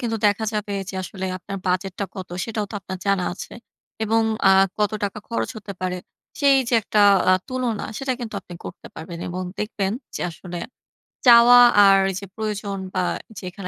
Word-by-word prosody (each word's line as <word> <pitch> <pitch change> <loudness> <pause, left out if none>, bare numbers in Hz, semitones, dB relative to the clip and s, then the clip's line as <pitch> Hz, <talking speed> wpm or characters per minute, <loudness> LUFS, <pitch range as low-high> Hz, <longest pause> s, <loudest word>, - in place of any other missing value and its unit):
কিন্তু 230 -2 -1
দেখা 205 +2 +1
যাবে 210 -1 -3
যে 200 - -6
আসলে 190 0 -5
আপনার 195 +2 -7
বাজেটটা 185 +2 -1
কত 190 -2 -7 0.2
সেটাও 220 -2 -3
তো - - -8
আপনার 185 -1 -7
জানা 195 -2 +2
আছে। - - -9 0.5
এবং 225 +1 +2 0.3
আ - - +7 0.3
কত 210 0 +1
টাকা 205 +1 -4
খরচ 230 - -2
হতে 205 -1 -8
পারে 185 0 -2 0.4
সেই 280 -2 +5
যে 240 - +1
একটা 210 +1 +1 0.3
আ - - +7 0.2
তুলনা 250 -4 -2
সেটা 270 -1 -1
কিন্তু 235 -3 -6
আপনি 175 - -12
করতে - - -9
পারবেন 170 +1 -8
এবং 180 +1 -4 0.2
দেখবেন 200 -2 -2 0.2
যে - - -6
আসলে 175 +1 -8 0.7
চাওয়া 240 0 +9 0.3
আর 195 0 +7
এইযে 195 +2 -6
প্রয়োজন 210 -2 -3 0.2
বা 185 - 0 0.4
যেখানে 185 0 -7
200 Hz, 175 wpm, -22 LUFS, 185-225 Hz, 0.7 s, চাওয়া